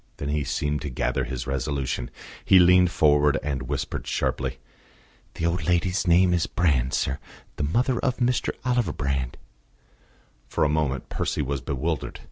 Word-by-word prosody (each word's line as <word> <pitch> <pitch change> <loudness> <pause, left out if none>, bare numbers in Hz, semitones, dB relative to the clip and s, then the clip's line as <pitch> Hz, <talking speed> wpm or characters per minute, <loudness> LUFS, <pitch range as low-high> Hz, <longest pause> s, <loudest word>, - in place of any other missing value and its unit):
Then 70 - -4
he 75 0 0
seemed 75 +1 -1
to 75 - -4
gather 60 - -1
his 65 -2 -4
resolution; 70 -2 -2 0.3
he 95 - +6
leaned 90 0 +6
forward 75 -2 +3
and 65 -3 -3
whispered - - -3
sharply. 65 - -1 0.8
"The 80 - -2
old 85 -1 0
lady's 90 +2 +1
name 90 +1 +5
is 85 -1 +1
Brand, 65 -7 +1
sir 70 +2 -1 0.4
the - - -1
mother 120 - +1
of 130 -3 0
Mr. 125 0 +1 0.2
Oliver 120 -10 +1
Brand." 70 -3 -2 1.1
For - - 0
a 75 - +3
moment 75 -4 -1
Percy - - -1
was 70 0 -3
bewildered. 70 +4 -3
75 Hz, 155 wpm, -25 LUFS, 70-90 Hz, 1.1 s, he